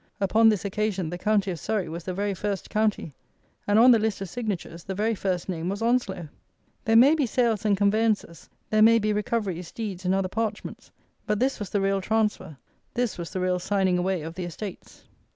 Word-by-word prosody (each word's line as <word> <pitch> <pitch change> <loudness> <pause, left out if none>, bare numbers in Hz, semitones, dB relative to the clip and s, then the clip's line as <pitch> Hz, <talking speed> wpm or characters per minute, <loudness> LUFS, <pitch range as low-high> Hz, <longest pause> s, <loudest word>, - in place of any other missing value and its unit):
Upon 220 +3 +4
this 210 -2 0
occasion 200 -4 -1
the 175 - -4
county 205 -1 +1
of 170 - -5
Surrey 200 +4 -2
was 165 +2 -7
the 185 - -3
very 200 +1 -1
first 200 0 -4
county; 210 -8 0 0.5
and 205 +1 +3
on 245 +3 +8
the 230 - +5
list 215 -1 -1
of 195 -2 -5
signatures 185 -6 -5
the 190 - -5
very 220 +3 +1
first 185 -4 -2
name 175 -2 -3
was 200 +3 -3
Onslow! 220 -8 0 0.6
There 225 - +3
may 260 +6 +7
be 295 -5 +1
sales 230 -3 0
and 205 -2 +3
conveyances; 205 -3 0 0.2
there 215 0 +3
may 230 +1 +7
be 215 -1 0
recoveries, 205 -5 -2
deeds, 200 -5 -5
and 185 +1 +1
other 195 -1 0
parchments; 215 +2 -4 0.4
but 210 -1 0
this 265 +2 0
was 205 -3 -5
the 205 - 0
real 195 0 +1
transfer; 210 -7 -1 0.4
this 240 -6 -1
was 170 - -5
the 185 - -4
real 180 0 +1
signing 190 -1 +1
away 180 -2 -1
of 160 +1 -6
the 180 0 -5
estates. 180 +3 -8
200 Hz, 205 wpm, -26 LUFS, 185-220 Hz, 0.6 s, on